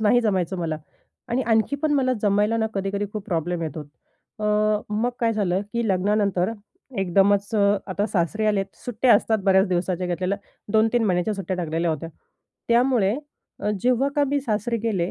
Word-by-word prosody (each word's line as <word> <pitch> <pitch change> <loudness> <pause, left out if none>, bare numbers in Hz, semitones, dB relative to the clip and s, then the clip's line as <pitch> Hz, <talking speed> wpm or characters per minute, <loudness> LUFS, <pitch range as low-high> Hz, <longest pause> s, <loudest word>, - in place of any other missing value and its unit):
नाही 220 +3 +4
जमायचं 190 -5 0
मला. 165 -2 -2 0.5
आणि 250 +3 0
आणखी 225 +4 +1
पण 295 +1 0
मला 260 -3 +2
जमायला 210 +2 +2
ना 220 -1 +1
कधीकधी 195 +1 -2
खूप 210 -2 -5
प्रॉब्लेम 175 -2 -1
येतो. 155 0 -4
अ, 150 +8 -13 0.5
मग 220 +4 0
काय 230 -1 +2
झालं, 195 -3 0
की 235 -1 -1
लग्नानंतर, 195 0 +1 0.5
एकदमच 195 +2 +3
अ, 205 -1 +4
आता 200 +2 -1
सासरे 205 +2 0
आलेत. 205 -2 +2 0.2
सुट्ट्या 245 0 +3
असतात 220 +1 +2
बऱ्याच 190 0 +4
दिवसांच्या 180 0 -1
घेतलेल्या, 180 +3 -1 0.3
2-3 225 +2 +3
महिन्यांच्या 185 +1 +1
सुट्ट्या 190 -2 -3
टाकलेल्या 165 -1 -1
होत्या. 160 +1 -4 0.6
त्यामुळे, 235 -4 +3 0.5
अ, 210 - 0
जेव्हा 255 +2 +2
का 290 - +4
मी 285 +1 +1
सासरी 230 -2 -1
गेले 200 -5 -1
205 Hz, 165 wpm, -24 LUFS, 185-225 Hz, 0.6 s, नाही